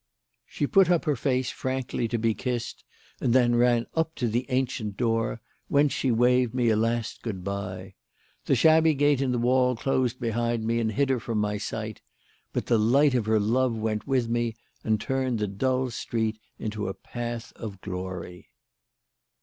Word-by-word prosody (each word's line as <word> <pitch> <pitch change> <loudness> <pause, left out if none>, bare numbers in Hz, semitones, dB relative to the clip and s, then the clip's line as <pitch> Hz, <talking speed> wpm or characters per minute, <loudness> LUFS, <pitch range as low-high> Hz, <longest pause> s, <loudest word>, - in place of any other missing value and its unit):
She 145 - -2
put 190 +5 +4
up 175 -2 +2
her 150 - +2
face 130 0 0
frankly 130 -2 -2
to 120 - -1
be 115 0 +1
kissed 120 0 -4 0.4
and 120 - +1
then 120 -2 +4
ran 120 -1 +3
up 160 0 -1
to 120 - -1
the 120 +3 -1
ancient 125 -5 -1
door; 115 -1 0 0.3
whence 145 0 +3
she 135 - 0
waved 125 +1 +3
me 120 -2 +2
a 110 - +3
last 115 +1 -1
good 100 -6 -5
bye. 95 -1 -5 0.5
The - - +3
shabby 160 0 +5
gate 145 -1 +3
in 135 -2 +1
the 125 - 0
wall 125 +1 +3
closed 130 0 0
behind 115 -1 -1
me 115 +1 +1
and 110 -1 0
hid 140 +5 +1
her 130 -2 +2
from 115 -1 -3
my 105 0 0
sight; 110 +1 -5 0.5
but - - -2
the 115 - +3
light 135 +6 +4
of 120 -4 0
her 110 0 +3
love 120 +3 +1
went 110 -1 -2
with 130 -4 +1
me 120 -1 -1 0.3
and 110 -1 +1
turned 130 0 -1
the 105 - 0
dull 130 +5 0
street 110 -1 -2 0.2
into 105 -2 -4
a 95 - -4
path 120 -1 -6
of 105 -4 -7
glory. 90 -2 -6
120 Hz, 180 wpm, -26 LUFS, 110-130 Hz, 0.5 s, shabby